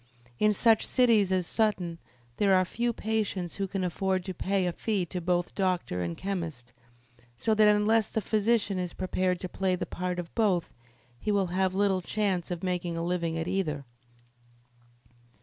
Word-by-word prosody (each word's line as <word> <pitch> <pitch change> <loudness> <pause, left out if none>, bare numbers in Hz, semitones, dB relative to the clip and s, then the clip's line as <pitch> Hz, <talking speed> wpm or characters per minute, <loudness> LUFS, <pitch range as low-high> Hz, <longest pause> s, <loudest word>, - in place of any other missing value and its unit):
In 215 - +4
such 220 +1 +4
cities 225 -6 +4
as 185 -2 +1
Sutton 180 -6 0 0.4
there 195 -2 +4
are 185 0 +4
few 235 +6 -1
patients 210 -6 -2
who 195 -1 -1
can 195 0 -3
afford 185 +1 -1
to 190 - -4
pay 190 +1 0
a 175 - 0
fee 205 -3 -1
to 180 +1 -5
both 175 0 0
doctor 180 - -1
and 85 -1 -3
chemist, 165 -11 -5 0.6
so 220 - +1
that 215 0 +5
unless 210 +1 +3
the - - -1
physician 210 -1 +1
is 180 -1 -3
prepared 185 -1 -1
to 185 - -3
play 185 0 0
the 180 0 -3
part 180 +1 -3
of 175 -2 -6
both 195 -7 +1 0.5
he 210 - -1
will 200 -2 +2
have 190 0 +1
little 195 -2 +2
chance 190 -2 -1
of 175 -1 -4
making 180 -2 -2
a 165 - -2
living 170 -2 -1
at 165 +1 -3
either. 160 -7 -1
185 Hz, 175 wpm, -28 LUFS, 175-210 Hz, 0.6 s, that